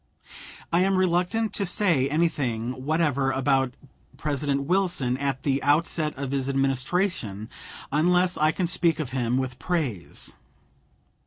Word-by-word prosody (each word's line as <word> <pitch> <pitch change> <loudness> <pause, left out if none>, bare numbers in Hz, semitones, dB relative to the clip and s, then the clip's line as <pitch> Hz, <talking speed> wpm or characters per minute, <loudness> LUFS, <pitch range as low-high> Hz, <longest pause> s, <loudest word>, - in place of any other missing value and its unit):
I 170 - +4
am 190 +1 +2
reluctant 185 +5 +1
to - - -1
say 175 -8 +2
anything 130 -6 -1
whatever 145 -4 +1
about 135 -1 +1 0.4
President 140 -1 -1
Wilson 175 -6 +1
at 140 -1 -2
the 140 -1 +1
outset 150 +1 +1
of 135 -1 -4
his 135 -1 -1
Administration 135 - 0 0.4
unless 180 +4 +3
I 155 +1 +3
can 185 - -1
speak 170 -1 +1
of 140 -6 -3
him 125 -1 0
with 130 -1 -3
praise. 145 - -3
145 Hz, 130 wpm, -25 LUFS, 130-175 Hz, 0.4 s, I